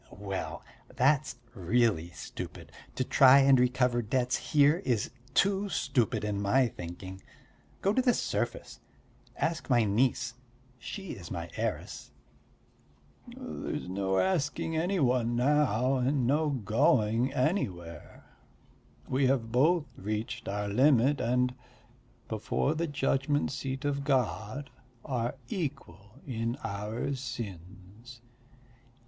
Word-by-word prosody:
"Well, 100 -1 -5 0.3
that's 135 +3 +2 0.2
really 100 -3 +1
stupid; 75 - -8 0.2
to 130 - 0
try 135 +1 +7
and 135 -1 +6
recover 125 -1 +2
debts 125 +3 0
here 145 +1 +3
is 120 - 0 0.2
too 200 +1 +2
stupid, 125 - 0
to 105 -1 -1
my 100 +6 +2
thinking! 95 +1 -8 0.6
Go 195 - +3
to 260 - +3
the 250 -2 +3
surface. - - -3 0.6
Ask 160 -1 -2
my 120 -3 +4
niece 115 +3 +1 0.5
she 195 - -7
is - - -8
my - - -5
heiress." - - -4 1.2
"There's 245 - -6
no 95 +1 -1
asking 160 - 0
any 180 +4 0
one 125 -3 +2
now, 130 -1 +2
and 130 0 +1
no 150 +4 +2
going 120 -1 +2
anywhere. 95 - -3 0.8
We 130 +1 +2
have 120 -4 0
both 150 +6 +3
reached 105 +3 -4
our 105 +1 -2
limit 130 +5 +3
and, 125 +1 +1 0.7
before 110 +6 -1
the 165 +2 -1
judgment 145 0 0
seat 135 0 -4
of 140 -1 -1
God, 130 -1 -1 0.3
are 120 -1 -2
equal 115 - -5
in 115 -2 -2
our 105 +7 -3
sins." 115 -1 -8
125 Hz, 115 wpm, -30 LUFS, 105-145 Hz, 1.2 s, try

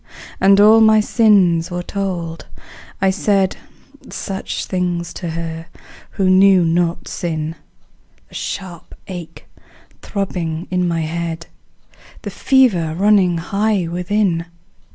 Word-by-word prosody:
And 195 +1 +5
all 215 +2 +7
my 220 0 +6
sins 195 -7 +3
were 175 0 -4
told; 175 -4 -4 0.6
I 190 - +4
said 195 -1 +1 0.5
Such 195 -1 -5
things 175 -2 -2
to 175 - -6
her 165 0 -5 0.4
who 195 -3 -1
knew 185 -1 +5
not 170 +1 0
sin 160 -3 -3 0.7
The - - -22
sharp 180 -4 -7
ache 175 -4 -9 0.6
throbbing 175 -5 -4
in 180 -1 0
my 165 -1 -1
head, 165 +1 -4 0.8
The - - -5
fever 200 - +2
running 190 -2 +3
high 200 +1 -1
within. 180 0 -1
180 Hz, 110 wpm, -18 LUFS, 170-195 Hz, 0.8 s, all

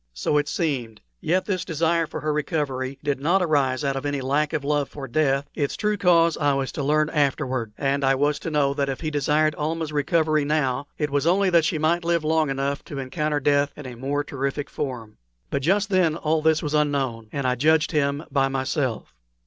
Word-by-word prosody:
So 105 - +1
it 145 - -2
seemed: 130 -9 -2 0.2
yet 185 +3 0
this 185 -3 -1
desire 165 0 0
for - - -6
her 155 0 -1
recovery 140 -3 -2
did 145 -2 -1
not 175 +7 +2
arise 140 -6 +1
out 140 -1 0
of 135 - -3
any 145 -1 -1
lack 140 +3 0
of 155 -3 -2
love 145 -1 0
for 140 -2 -7
death; 140 +1 +1
its 145 -2 -2
true 210 0 0
cause 170 -4 +4
I 145 -2 +2
was 135 -1 -2
to - - -4
learn 155 +2 +2
afterward; 130 -6 0
and 140 0 0
I 135 0 +4
was 145 +2 +1
to - - -4
know 145 -3 +1
that 140 -1 -1
if 135 - -4
he 155 -2 -2
desired 150 +2 +2
Almah's 160 0 -2
recovery 155 +1 +2
now, 145 -2 0
it 150 -2 -2
was 145 +2 +1
only 190 +2 +3
that 170 -2 +4
she 165 0 0
might 165 +3 +1
live 170 -1 +1
long 155 -1 +2
enough 140 +1 -2
to 145 - -7
encounter 145 +3 -1
death 145 0 +2
in 150 - -9
a 125 - -7
more 140 +4 -2
terrific 140 0 -4
form. 120 -7 -5 0.3
But 140 - -1
just 195 +7 +1
then 180 -5 +3
all 160 -1 0
this 160 0 +2
was 150 -1 -3
unknown, 135 -7 0
and 140 -2 -3
I 125 - +2
judged 155 +5 +2
him 145 -1 0
by 135 -2 +2
myself. 130 -2 -2
145 Hz, 215 wpm, -24 LUFS, 135-155 Hz, 0.3 s, cause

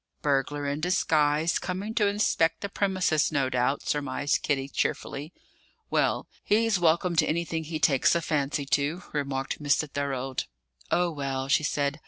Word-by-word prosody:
"Burglar 145 0 0
in 145 +2 -2
disguise, 160 -3 +2
coming 190 +4 -4
to 215 -3 +2
inspect 200 -5 +1
the 200 - -3
premises, 185 -7 +1
no 135 -3 0
doubt," 125 +2 0
surmised 145 0 0
Kitty 135 -2 0
cheerfully. 145 +2 -3 0.6
"Well, - - +1 0.2
he's 220 -2 +2
welcome 170 +1 +2
to - - +5
anything 165 0 -1
he 160 +1 -3
takes 145 0 +3
a 170 - +1
fancy 145 -2 -1
to," 145 +6 0
remarked 140 -1 -2
Mr. 145 +1 +2
Thorold. 135 -2 -3 0.4
"Oh, 175 0 +2
well!" 135 -3 -3
she 145 - +4
said. 145 0 -1
150 Hz, 150 wpm, -27 LUFS, 140-170 Hz, 0.6 s, to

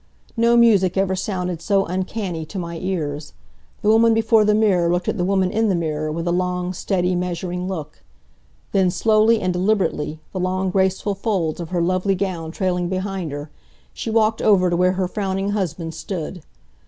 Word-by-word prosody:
No 235 0 +4
music 200 -6 +4
ever 190 -1 +1
sounded 180 -3 -3
so 195 +2 +2
uncanny 185 -1 -3
to 200 - -8
my 170 -2 -4
ears. 155 -6 -3 0.5
The 210 - +3
woman 225 +1 +5
before 225 -1 +4
the 210 0 +3
mirror 185 -6 +3
looked 175 0 -1
at - - 0
the - - +1
woman 190 0 +1
in 225 0 +1
the 190 - +2
mirror 155 -2 -2
with 165 +2 -3
a - - +2
long, 180 0 -1
steady, 180 0 0
measuring 180 0 -3
look. 155 -6 -6 0.7
Then, 190 -2 +3
slowly 220 +3 +3
and 185 -2 -1
deliberately, 180 -5 0
the 190 - -3
long 185 +1 -1
graceful 190 +2 +1
folds 195 -6 -1
of 170 -2 -5
her 175 -2 0
lovely 185 +2 +1
gown 180 -4 -3
trailing 180 0 -1
behind 190 -3 -3
her, 145 +1 -7 0.4
she - - -5
walked 220 0 +2
over 185 -4 +4
to - - +2
where 180 +1 +3
her 185 -1 -1
frowning 195 0 -2
husband 175 -5 -3
stood. 175 +1 -5
185 Hz, 180 wpm, -21 LUFS, 175-200 Hz, 0.7 s, woman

